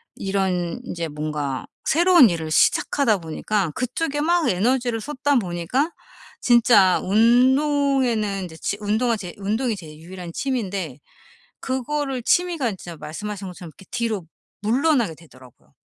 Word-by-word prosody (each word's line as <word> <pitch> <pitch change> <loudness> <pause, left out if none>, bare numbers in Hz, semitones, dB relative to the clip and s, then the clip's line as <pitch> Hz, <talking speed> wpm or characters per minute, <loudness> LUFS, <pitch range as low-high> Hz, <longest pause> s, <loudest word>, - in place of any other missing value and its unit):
이런 190 -1 -1
인제 170 -5 -4
뭔가 150 -3 -3 0.2
새로운 340 - +6
일을 160 -2 -3
시작하다 225 - +3
보니까 170 +2 -2
그쪽에 290 +4 -2
막 340 -2 +2
에너지를 235 +4 +1
쏟다 285 +2 -1
보니까 185 - -1 0.5
진짜 230 -6 +5
운동에는 245 -1 +2
인제 160 -2 -9
치 200 - -3
운동하 220 +3 +1
제 180 -4 -7
운동이 220 +4 -1
제 165 -4 -10
유일한 175 +1 -9
취미인데 195 - -3 0.6
그거를 265 0 -2
취미가 340 -8 +1
진짜 175 -3 -9
말씀하신 200 +6 -6
것처럼 175 -2 -10
이렇게 185 +5 -17
뒤로 225 -7 -2 0.4
물러나게 245 - +2
되더라고요. 130 -6 -19
215 Hz, 320 characters per minute, -22 LUFS, 175-260 Hz, 0.6 s, 새로운